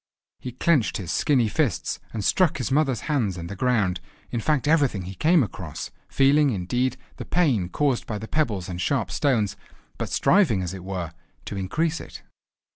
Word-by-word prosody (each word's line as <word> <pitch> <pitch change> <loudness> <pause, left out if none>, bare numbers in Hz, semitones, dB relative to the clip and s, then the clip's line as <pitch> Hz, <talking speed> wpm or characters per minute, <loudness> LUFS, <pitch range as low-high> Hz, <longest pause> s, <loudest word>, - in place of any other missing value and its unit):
He 125 - -7
clenched 140 -2 +2
his 95 -5 -5
skinny 130 -6 +2
fists, 125 - -1
and 105 -3 -4
struck 180 -5 +3
his 125 -4 -3
mother's 135 -4 +2
hands 120 - 0
and 85 0 -6
the 100 - -5
ground, 100 -6 +1 0.3
in 120 - -1
fact 145 +3 0
everything 140 - +2
he 95 +2 -7
came 155 - +4
across, 100 - -6 0.2
feeling, 140 +2 +4
indeed, 125 +5 -1 0.2
the - - -5
pain 130 - +1
caused 140 +2 0
by 105 - -3
the 110 - -7
pebbles 110 - -1
and 90 -1 -5
sharp 130 +1 0
stones, 120 -9 +1 0.4
but - - -3
striving, 160 - +3
as 90 0 -4
it 95 -2 -8
were, 90 -3 -4 0.3
to - - -5
increase 155 - -1
it. - - -11
120 Hz, 180 wpm, -25 LUFS, 95-145 Hz, 0.4 s, came